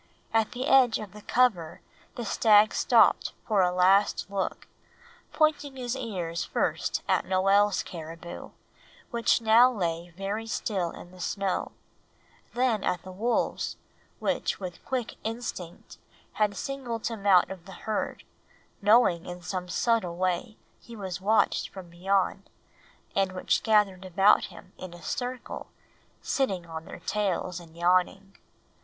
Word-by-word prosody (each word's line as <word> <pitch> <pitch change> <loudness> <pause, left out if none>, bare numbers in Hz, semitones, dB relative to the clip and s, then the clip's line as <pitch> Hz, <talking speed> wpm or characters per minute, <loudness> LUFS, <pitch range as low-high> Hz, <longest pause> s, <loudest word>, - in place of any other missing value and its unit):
At 225 -1 +2
the 255 +1 -3
edge 260 -5 +5
of 205 -3 -8
the 210 - -11
cover 205 -10 +1 0.4
the 240 - -5
stag 215 0 +5
stopped - - +4
for 210 -3 +2
a 180 -1 +3
last 190 +3 +3
look, 195 -1 -3 0.7
pointing 300 -3 +1
his 250 -1 -3
ears 185 -10 -3
first - - -1
at - - +2
Noel's 195 +2 +3
caribou, 165 0 -8 0.6
which 235 -1 +2
now 230 +3 +6
lay 170 -5 -3
very 205 +3 -3
still 195 -5 -1
in 175 - -11
the 185 - -15
snow, 195 +1 -2 0.8
then 240 -4 +1
at 180 -2 -1
the 185 - -9
wolves, 225 +6 -1 0.4
which - - -1
with 180 -3 -7
quick 250 -3 -3
instinct 220 -6 -6 0.3
had 210 -2 0
singled 255 -5 -4
him 220 -3 -3
out 185 -2 +5
of 185 -3 -9
the 190 - -10
herd, 215 -1 -2 0.6
knowing 205 -5 +4
in 175 0 -7
some 180 0 -4
subtle 205 -4 +1
way 185 +5 -1 0.2
he 235 - -12
was 190 -3 -5
watched 215 +3 +2
from 185 -3 -11
beyond, 195 +2 0 0.7
and 195 -1 +1
which 185 - 0
gathered 205 -4 +2
about 195 +3 +4
him 185 - -13
in 185 -2 -8
a 175 - -14
circle, 250 +7 -4 0.6
sitting 195 -11 -1
on 160 -1 -7
their - - -10
tails 185 -3 -1
and 165 -1 -15
yawning. 185 +3 +1
195 Hz, 140 wpm, -27 LUFS, 180-225 Hz, 0.8 s, now